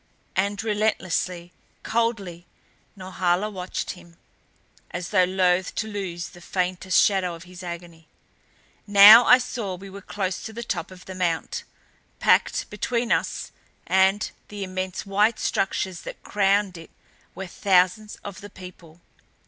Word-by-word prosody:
And 200 +2 0
relentlessly, 185 -5 -1 0.3
coldly, 205 -7 -2 0.5
Norhala 185 +1 -1
watched 185 -2 -4
him 175 -2 -14 0.7
as 175 +1 -5
though 185 -3 +5
loath 185 0 +1
to 220 - -2
lose 190 -5 -5
the 175 - -15
faintest 185 +1 0
shadow 185 -4 +2
of 165 - -12
his 180 0 -12
agony. 170 -2 -8 0.8
Now 205 +4 +10
I 250 - +8
saw 230 -6 -4
we 195 +2 -11
were 200 +1 -9
close 190 -2 -3
to 220 - -7
the 235 +2 -6
top 175 -7 -3
of 185 -1 -14
the 190 - -8
mount. 175 -3 -2 0.5
Packed - - +2
between 240 -1 -1
us - - -1 0.3
and 190 +2 +2 0.2
the 205 -1 -6
immense 185 0 -4
white 210 +3 +2
structures 190 -2 -1
that - - -9
crowned 200 -2 +1
it 165 - -12 0.5
were 190 +2 -5
thousands 185 +3 +1
of 195 -2 -8
the 205 - -10
people. 180 -3 -13
190 Hz, 140 wpm, -24 LUFS, 180-205 Hz, 0.8 s, Now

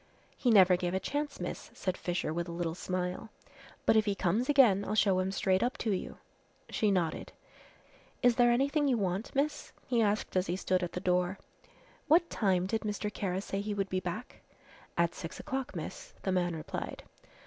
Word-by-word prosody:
"He 250 - 0
never 190 -5 +7
gave 180 0 -2
a - - +1
chance, 290 +6 -3
miss," - - -5
said 185 -1 -2
Fisher, 175 -4 -2
with 170 +1 -2
a - - -5
little 170 -1 -2
smile, 180 +4 -3 0.6
"but - - +5
if 215 -1 +4
he 205 -2 0
comes 200 +8 0
again 240 -9 +5
I'll 210 - -2
show 195 -3 +4
him 185 +1 0
straight 190 0 +1
up 245 +2 0
to 220 - -1
you." 190 - -3 0.5
She 215 - +2
nodded. 180 -5 -1 0.9
"Is 245 -1 +5
there 240 0 +5
anything 280 +4 +2
you 255 -3 +3
want, 195 +2 -1
miss?" 285 +3 -1
he 240 -2 +2
asked 210 -2 0
as 185 0 +2
he 175 - 0
stood 185 -1 0
at 175 - -3
the - - -2
door. 180 +1 +1 0.7
"What 335 +2 +4
time 185 -4 +2
did 220 +3 -1
Mr. 210 0 -3
Kara 190 -2 -2
say 195 0 -3
he 205 0 -3
would 195 -1 -1
be 185 - 0
back?" 185 +7 -6 0.6
"At 170 0 +2
six 165 - -7
o'clock, 270 -1 -4
miss," - - -7
the 190 - 0
man 175 -2 +1
replied. 155 - -5
195 Hz, 195 wpm, -31 LUFS, 180-230 Hz, 0.9 s, never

